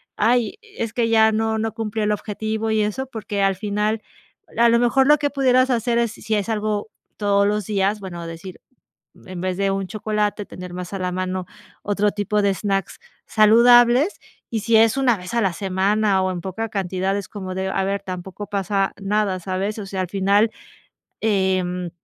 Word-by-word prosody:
"Ay, 235 Hz, -, +2 dB
es 395 Hz, -, -6 dB
que 235 Hz, -2 st, +1 dB
ya 220 Hz, -1 st, +5 dB
no 220 Hz, 0 st, 0 dB
no 220 Hz, -1 st, -2 dB
cumplió 220 Hz, -1 st, -2 dB
el 210 Hz, -, +2 dB
objetivo", 220 Hz, +1 st, -3 dB
y 220 Hz, 0 st, +2 dB
eso 210 Hz, +6 st, -2 dB
porque, 210 Hz, -4 st, -4 dB
al 195 Hz, -1 st, +2 dB
final, 210 Hz, +2 st, -1 dB, 0.6 s
a 235 Hz, 0 st, +5 dB
lo 235 Hz, 0 st, +4 dB
mejor 245 Hz, +3 st, +3 dB
lo 300 Hz, +1 st, +6 dB
que 290 Hz, 0 st, 0 dB
pudieras 260 Hz, -2 st, +3 dB
hacer 235 Hz, -1 st, +1 dB
es 235 Hz, -2 st, +1 dB
si 220 Hz, -, -4 dB
es 205 Hz, 0 st, -1 dB
algo 215 Hz, -1 st, -1 dB, 0.3 s
todos 200 Hz, -1 st, +2 dB
los 210 Hz, -1 st, -1 dB
días. 200 Hz, +1 st, 0 dB
Bueno, 175 Hz, -4 st, -7 dB
decir, 165 Hz, +3 st, -9 dB, 0.7 s
en 185 Hz, -1 st, -7 dB
vez 185 Hz, 0 st, -2 dB
de 195 Hz, 0 st, +1 dB
un 195 Hz, 0 st, -2 dB
chocolate, 210 Hz, 0 st, -2 dB
tener 180 Hz, -1 st, -9 dB
más 180 Hz, 0 st, -6 dB
a 195 Hz, -, -3 dB
la 180 Hz, -1 st, -2 dB
mano 185 Hz, 0 st, -3 dB, 0.4 s
otro 205 Hz, 0 st, +1 dB
tipo 210 Hz, 0 st, 0 dB
de 200 Hz, -1 st, +3 dB
snacks 195 Hz, +1 st, -2 dB, 0.3 s
saludables. 240 Hz, -, +5 dB, 0.3 s
Y 225 Hz, -, -1 dB
si 225 Hz, +2 st, +2 dB
es 225 Hz, +2 st, +5 dB
una 250 Hz, -4 st, +3 dB
vez 180 Hz, +1 st, -9 dB
a 235 Hz, -, +2 dB
la 195 Hz, -3 st, +1 dB
semana, 195 Hz, +1 st, +1 dB
o 185 Hz, -, 0 dB
en 180 Hz, -1 st, -4 dB
poca 210 Hz, +5 st, -4 dB
cantidad 190 Hz, -1 st, -1 dB
es 200 Hz, -, -5 dB
como 190 Hz, -3 st, -6 dB
de 190 Hz, 0 st, -2 dB
a 190 Hz, -, 0 dB
ver, 200 Hz, 0 st, -2 dB
tampoco 190 Hz, +2 st, -7 dB
pasa 195 Hz, 0 st, 0 dB
nada, 200 Hz, -1 st, 0 dB
¿sabes? 190 Hz, +4 st, -3 dB
O 205 Hz, -, -6 dB
sea, 190 Hz, -1 st, -3 dB
al 185 Hz, -, -4 dB
final, 200 Hz, +3 st, +2 dB, 0.7 s
em, 185 Hz, -4 st, 0 dB
205 Hz, 195 wpm, -22 LUFS, 190-220 Hz, 0.7 s, lo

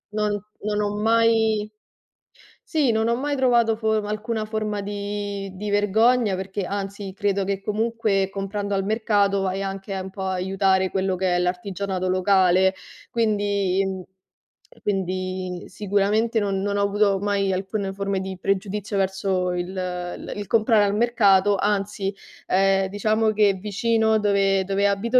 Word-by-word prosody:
non 210 Hz, -1 st, +1 dB, 0.3 s
non 210 Hz, -1 st, 0 dB
ho 205 Hz, -, 0 dB, 0.2 s
mai 225 Hz, -2 st, +3 dB, 1.0 s
sì, 300 Hz, -7 st, +2 dB
non 220 Hz, 0 st, +1 dB
ho 235 Hz, -, +2 dB
mai 285 Hz, +2 st, -2 dB
trovato 235 Hz, -4 st, +3 dB
form 220 Hz, -1 st, 0 dB
alcuna 215 Hz, +1 st, -2 dB
forma 215 Hz, -1 st, -3 dB
di 205 Hz, 0 st, -4 dB
di 205 Hz, +2 st, -5 dB
vergogna, 210 Hz, +2 st, +3 dB
perché 190 Hz, +1 st, -4 dB
anzi 195 Hz, 0 st, -5 dB
credo 200 Hz, -2 st, 0 dB
che 195 Hz, 0 st, -2 dB
comunque, 215 Hz, -1 st, 0 dB
comprando 200 Hz, +1 st, -3 dB
al 195 Hz, -, 0 dB
mercato 205 Hz, -2 st, +1 dB
vai 190 Hz, +1 st, -1 dB
anche 195 Hz, 0 st, -4 dB
un 190 Hz, 0 st, -5 dB
po' 190 Hz, 0 st, -7 dB
a 190 Hz, -, -1 dB
aiutare 190 Hz, 0 st, +1 dB
quello 190 Hz, 0 st, 0 dB
che 180 Hz, -1 st, +1 dB
è -, -, +1 dB
l'artigianato 185 Hz, +1 st, -2 dB
locale, 185 Hz, 0 st, +3 dB, 0.4 s
quindi 205 Hz, -4 st, +1 dB
mhmm, 190 Hz, -1 st, -4 dB, 0.8 s
quindi 185 Hz, -2 st, -3 dB
sicuramente 210 Hz, +3 st, +1 dB
non 195 Hz, -1 st, -1 dB
non 200 Hz, 0 st, -1 dB
ho 200 Hz, -, +1 dB
avuto 200 Hz, -1 st, +2 dB
mai 200 Hz, -1 st, 0 dB
alcune 195 Hz, +1 st, -3 dB
forme 195 Hz, 0 st, -2 dB
di 190 Hz, 0 st, -5 dB
pregiudizio 200 Hz, +2 st, -2 dB
verso 190 Hz, -1 st, 0 dB
il 175 Hz, 0 st, -2 dB
il 180 Hz, -2 st, -5 dB
il 205 Hz, 0 st, -5 dB
comprare 220 Hz, -1 st, +4 dB
al 200 Hz, 0 st, +1 dB
mercato, 205 Hz, -3 st, +4 dB
anzi, 200 Hz, 0 st, -1 dB, 0.3 s
ehm, 195 Hz, 0 st, +3 dB
diciamo 215 Hz, +2 st, +1 dB
che 210 Hz, -2 st, +3 dB
vicino 220 Hz, +3 st, +1 dB
dove 195 Hz, -2 st, +2 dB
dove 200 Hz, +1 st, +1 dB
abito 230 Hz, +6 st, +2 dB
200 Hz, 150 wpm, -23 LUFS, 190-215 Hz, 1.0 s, comprare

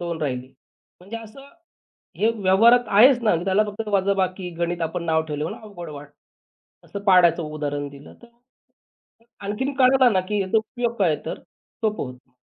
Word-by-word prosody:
2 170 Hz, -2 st, -4 dB
राहिली. 130 Hz, -3 st, -3 dB, 0.5 s
म्हणजे 200 Hz, +6 st, -8 dB
असं 230 Hz, +5 st, -12 dB, 0.7 s
हे 220 Hz, -, +2 dB
व्यवहारात 225 Hz, +5 st, +4 dB
आहेच 245 Hz, +5 st, +6 dB
ना 210 Hz, -, +3 dB
त्याला 195 Hz, +2 st, +2 dB
फक्त 215 Hz, +1 st, -6 dB
वजाबाकी 190 Hz, -2 st, 0 dB
गणित 170 Hz, 0 st, -2 dB
आपण 165 Hz, +2 st, -3 dB
नाव 160 Hz, -1 st, +2 dB
ठेवलं 150 Hz, -1 st, -4 dB
म्हणून 160 Hz, -, -5 dB
अवघड 180 Hz, -6 st, -9 dB
वाटतं. 145 Hz, -1 st, -10 dB, 0.8 s
असं 200 Hz, -, -6 dB
पाढ्याचं 180 Hz, -3 st, +5 dB
उदाहरण 145 Hz, -2 st, -4 dB
दिलं 140 Hz, 0 st, -14 dB
तर. -, -, -14 dB, 1.2 s
आणखीन 260 Hz, +8 st, -2 dB
कळाला 260 Hz, -1 st, +5 dB
ना 190 Hz, -4 st, +1 dB
की 210 Hz, -, 0 dB
ह्याचा 195 Hz, +3 st, +1 dB
उपयोग 235 Hz, +1 st, -2 dB
काय 175 Hz, -5 st, +3 dB
आहे -, -, -7 dB
तर -, -, -5 dB, 0.4 s
सोपं 215 Hz, 0 st, 0 dB
होतं. 125 Hz, 0 st, -13 dB
190 Hz, 165 wpm, -23 LUFS, 160-220 Hz, 1.2 s, आहेच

